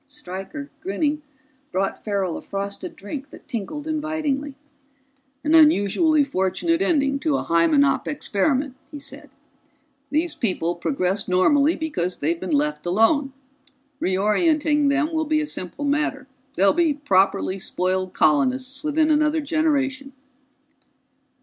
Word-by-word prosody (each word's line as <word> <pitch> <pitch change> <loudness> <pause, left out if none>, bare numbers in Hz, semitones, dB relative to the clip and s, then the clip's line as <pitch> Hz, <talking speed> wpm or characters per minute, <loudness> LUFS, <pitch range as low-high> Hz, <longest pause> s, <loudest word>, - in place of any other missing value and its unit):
Stryker, 280 +1 -7
grinning, 305 -4 -1 0.5
brought 195 +1 -2
Farrell 195 -5 -1
a - - -6
frosted 200 0 -5
drink 270 +7 -7
that - - -15
tinkled 290 +4 -5
invitingly. 305 -3 -2 0.9
"An 305 +1 +1
unusually 310 - +5
fortunate 270 - 0
ending 280 -6 +1
to 290 -1 +1
a - - -3
Hymenop 270 - +3
experiment," 275 +1 -1
he 295 - -8
said. 285 - -9 0.8
"These 315 +2 0
people 180 -6 -1
progressed 190 0 -1
normally 285 - +3
because 295 - -3
they've 335 +1 -1
been - - -5
let 300 -1 0
alone. 225 - +2 0.7
Reorienting 290 - +2
them 300 +3 +1
will 315 0 0
be 310 0 +1
a 305 - -1
simple 235 - -6
matter; 285 -2 -1 0.3
they'll 195 +1 +4
be 330 -3 +2
properly 195 -7 +1
spoiled 185 0 -2
colonists 255 - +1
within 310 +1 +2
another 305 +1 +2
generation." 280 -3 0
280 Hz, 125 wpm, -23 LUFS, 200-305 Hz, 0.9 s, unusually